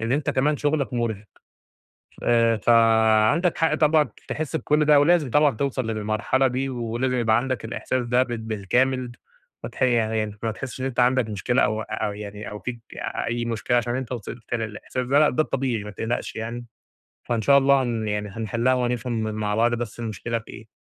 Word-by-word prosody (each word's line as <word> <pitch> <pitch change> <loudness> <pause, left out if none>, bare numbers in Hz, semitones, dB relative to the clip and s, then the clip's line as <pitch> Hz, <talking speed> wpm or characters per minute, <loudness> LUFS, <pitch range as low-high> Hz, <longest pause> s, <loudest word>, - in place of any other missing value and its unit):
إن 115 +2 -1
أنت 145 0 0
كمان 145 +3 +1
شغلك 145 -5 -1
مرهق، 110 -3 -2 1.0
آآ 115 -1 +3
فعندك 115 - +4
حق 160 -1 +2
طبعًا 155 -3 +3 0.2
تحس 155 +1 -3
بكل 150 -1 +1
ده، 150 -1 +6
ولازم 155 -2 +3
طبعًا 150 -2 +3
توصل 130 -2 -2
للمرحلة 110 +5 0
دي، 130 +2 -2
ولازم 120 +1 -2
يبقى 110 -2 +3
عندك 125 -2 -2
الإحساس 125 +2 -2
ده 125 +2 +3
بال 120 -2 -5
بالكامل، 120 +4 0 0.5
ماتح - - -8
يعني 110 -3 +1
ما 110 - 0
تحسش 130 +3 -7
إن - - -1
أنت 130 -2 -3
عندك 125 -2 +3
مشكلة، 120 +6 0
أو 110 +1 +1
أو 105 - -3
يعني 105 0 -7
أو 105 0 -7
فيك 120 -2 -6 0.5
أي 120 0 -2
مشكلة، 120 +1 0
عشان 120 +1 -1
أنت 130 -1 -4
وصلت 115 0 -6
للإحساس 115 +2 -4
ده 140 +3 +4
لأ، 150 - +5
ده 155 - +1
الطبيعي 125 -7 -2
ما 105 - -7
تقلقش 115 +3 -3
يعني، 115 +2 -5 0.6
فإن 115 -2 -1
شاء 140 +5 +6
الله 140 0 +4
هن 115 -3 -2
يعني 105 0 -2
هنحلها 115 +4 0
وهنفهم 120 -2 -1
مع 105 -1 -2
بعض 120 +2 +2
بس 120 -1 -5
المشكلة 115 +1 -3
في 115 - -15
إيه، 110 - -11
120 Hz, 180 wpm, -24 LUFS, 110-130 Hz, 1.0 s, ده